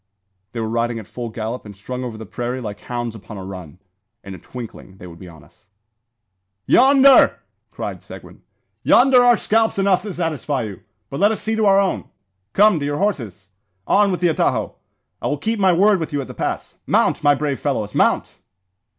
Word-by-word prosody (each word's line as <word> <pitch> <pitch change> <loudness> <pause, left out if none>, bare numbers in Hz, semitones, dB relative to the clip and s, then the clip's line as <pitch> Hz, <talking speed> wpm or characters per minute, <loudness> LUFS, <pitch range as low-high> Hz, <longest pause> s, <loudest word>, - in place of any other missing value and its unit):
They 120 - -4
were 110 - -2
riding 115 +1 -1
at 110 - -8
full 120 +4 -7
gallop, 115 +2 -5
and 105 -1 -11
strung 125 +6 -6
over 120 -3 -6
the 110 - -8
prairie 120 +4 -4
like 105 -4 -7
hounds 120 -2 -5
upon 110 -1 -10
a 95 - -7
run. 90 -4 -9 0.5
In 100 - -9
a 95 - -10
twinkling 110 -3 -10
they 90 - -12
would 85 -1 -12
be 95 - -11
on 80 -3 -14
us. 110 -3 -26 1.0
"Yonder!" 270 +1 +6 0.3
cried - - -6
Seguin, - - -13 0.4
"yonder 255 0 +5
are 245 -1 +5
scalps 225 0 +1
enough 195 -2 +2
to 210 - -6
satisfy 155 -6 -2
you; 100 -4 -7 0.3
but 140 - -4
let 205 +3 +4
us 220 - -2
see 220 0 -2
to 220 -1 +2
our 195 0 +5
own. 195 -2 -1 0.5
Come! 210 -4 +4
to 140 - -3
your 145 0 -2
horses! 115 - -3 0.4
On 205 0 +3
with 180 -2 -2
the 175 - +3
atajo! 160 - 0 0.5
I - - -2
will 145 - -1
keep 220 +9 -2
my 190 -2 +4
word 195 +3 +4
with 160 - -4
you 145 - 0
at 135 - -8
the - - -9
pass. - - -4
Mount! - - +1
my 145 -1 +5
brave 140 -1 -2
fellows, 110 -8 -2
mount!" - - +1
135 Hz, 200 wpm, -20 LUFS, -, 1.0 s, Yonder